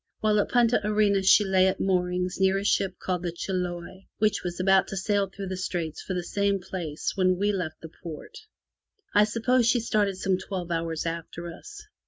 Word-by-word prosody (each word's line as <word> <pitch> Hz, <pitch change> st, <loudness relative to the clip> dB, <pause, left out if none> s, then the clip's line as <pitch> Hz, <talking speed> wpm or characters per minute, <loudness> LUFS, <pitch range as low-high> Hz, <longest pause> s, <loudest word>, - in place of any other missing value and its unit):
While 215 Hz, -1 st, +2 dB
at -, -, 0 dB
Punta 240 Hz, -2 st, +3 dB
Arenas 205 Hz, -2 st, +2 dB
she 210 Hz, -, +7 dB
lay 190 Hz, -1 st, +3 dB
at 190 Hz, -, -1 dB
moorings 180 Hz, -1 st, 0 dB
near 190 Hz, 0 st, +3 dB
a 195 Hz, -, -2 dB
ship 190 Hz, -2 st, +1 dB
called 180 Hz, -2 st, -2 dB
the 175 Hz, -1 st, -2 dB
Chiloe, 180 Hz, +1 st, -4 dB
which 215 Hz, 0 st, +1 dB
was 175 Hz, 0 st, -4 dB
about 190 Hz, 0 st, +4 dB
to 195 Hz, -, -5 dB
sail 200 Hz, +1 st, +1 dB
through 195 Hz, 0 st, -7 dB
the 190 Hz, -, -3 dB
Straits 170 Hz, -4 st, -3 dB
for 185 Hz, -, -4 dB
the 180 Hz, -, -2 dB
same 200 Hz, +2 st, 0 dB
place 170 Hz, -4 st, -4 dB
when 185 Hz, -1 st, +2 dB
we 205 Hz, +2 st, +1 dB
left 180 Hz, -6 st, -4 dB
the 160 Hz, -, -10 dB
port. 160 Hz, -3 st, -8 dB, 0.7 s
I 210 Hz, 0 st, +6 dB
suppose 235 Hz, +3 st, +2 dB
she 245 Hz, -, +3 dB
started 210 Hz, -4 st, 0 dB
some 190 Hz, -1 st, 0 dB
twelve 185 Hz, -2 st, -5 dB
hours 165 Hz, -1 st, -2 dB
after 170 Hz, +1 st, -5 dB
us. 415 Hz, -, -11 dB
190 Hz, 200 wpm, -26 LUFS, 180-205 Hz, 0.7 s, she